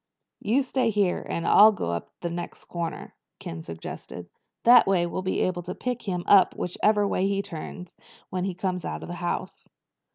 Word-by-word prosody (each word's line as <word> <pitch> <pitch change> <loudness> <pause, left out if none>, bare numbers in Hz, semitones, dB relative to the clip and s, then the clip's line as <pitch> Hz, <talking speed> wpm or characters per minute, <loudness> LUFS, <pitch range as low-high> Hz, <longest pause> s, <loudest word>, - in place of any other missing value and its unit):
"You 245 +7 +1
stay 255 -2 0
here 200 -4 +1
and 170 - -2
I'll 215 +1 +8
go 175 - -3
up 85 0 -4
to 175 - -2
the 170 - -4
next 175 0 -7
corner," 170 -1 -5 0.2
Ken 80 0 -7
suggested. 85 +1 -8 0.3
"That 240 0 +7
way 185 -3 +3
we'll 175 +2 -3
be 185 0 -1
able 180 -1 0
to 180 +1 -6
pick 245 -1 -3
him 180 -4 -3
up 195 -2 +5
whichever 205 +3 +1
way 190 -1 +1
he 200 0 0
turns 170 +1 -8 0.4
when 185 0 -1
he 190 -2 -3
comes 180 -1 -2
out - - -5
of - - -8
the - - -4
house." 175 - -4
185 Hz, 195 wpm, -26 LUFS, 175-205 Hz, 0.4 s, I'll